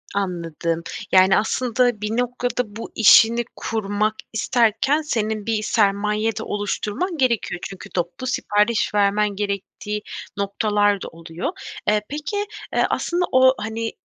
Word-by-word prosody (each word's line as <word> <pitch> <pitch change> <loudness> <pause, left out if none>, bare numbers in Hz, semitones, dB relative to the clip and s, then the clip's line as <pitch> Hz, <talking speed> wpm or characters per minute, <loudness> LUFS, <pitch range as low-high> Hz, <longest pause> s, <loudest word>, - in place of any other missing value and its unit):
Anladım. 170 -3 -2 0.3
Yani, 190 0 +6
aslında, 245 0 +1
bir 210 +2 -2
noktada 245 -2 -2
bu 225 - -7
işini 225 +2 +6
kurmak 215 0 -1 0.2
isterken, 235 +6 +2
senin 220 -7 -2
bir 220 -2 0
sermaye 210 +1 +1
de - - -4
oluşturman 210 - -2
gerekiyor. 240 -9 0
Çünkü 195 - -10
toplu 175 +8 -3
sipariş 215 -3 +1
vermen 205 +1 +3
gerektiği 205 +2 -4 0.4
noktalar 205 0 +1
da - - -5
oluyor. 165 +1 -5 0.4
Eee, 210 0 +3
peki, 355 +8 -3 0.3
eee, - - +3
aslında 355 +1 0
o 260 0 +6
hani, 225 +1 -3
215 Hz, 125 wpm, -22 LUFS, 200-240 Hz, 0.4 s, Yani